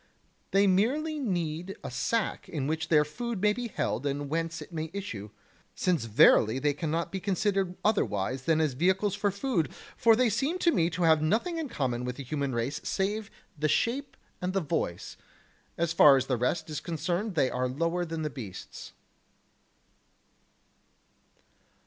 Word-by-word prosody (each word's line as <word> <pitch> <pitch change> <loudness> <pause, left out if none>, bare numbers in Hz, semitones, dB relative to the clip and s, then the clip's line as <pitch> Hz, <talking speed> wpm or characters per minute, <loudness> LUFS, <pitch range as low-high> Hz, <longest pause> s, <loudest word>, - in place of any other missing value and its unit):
They 200 +1 +4
merely 270 +12 +1
need 180 - -2
a - - -5
sack 210 - -1
in 145 -5 -3
which 160 +2 -1
their 150 -2 +4
food 235 +7 -4
may 210 +2 +3
be 245 +2 -4
held 165 - -2
and 140 0 -2
whence 165 0 -1
it 155 +3 -10
may 160 0 -3
issue, 115 - -5 0.5
since 175 -10 +1
verily 110 +1 +5
they 145 +2 +1
cannot 160 +2 -2
be 195 - -3
considered 195 -1 0
otherwise 130 - 0
than 160 -1 +3
as 155 -4 +1
vehicles 190 +8 +1
for 205 0 0
food, 200 - -1 0.2
for 225 -1 +5
they 250 +2 +3
seem 270 - 0
to 340 -2 +3
me 170 - +2
to 175 +1 -2
have 160 -2 +5
nothing 230 - 0
in 310 -4 -3
common 125 - -2
with 125 0 -3
the 140 - -7
human 140 +1 -2
race 120 +5 -2
save 205 +2 -1 0.3
the 155 0 0
shape 255 - 0 0.2
and 180 +1 -2
the 195 - +2
voice; 150 - -3 0.6
as 170 0 0
far 145 -4 +8
as 130 - 0
the 130 - 0
rest 125 +7 -1
is 150 - -3
concerned 175 +5 -2
they 135 -4 +2
are 125 0 0
lower 165 +7 -1
than 165 -2 -4
the 150 - -2
beasts. 105 -9 -9
165 Hz, 170 wpm, -29 LUFS, 145-200 Hz, 0.6 s, far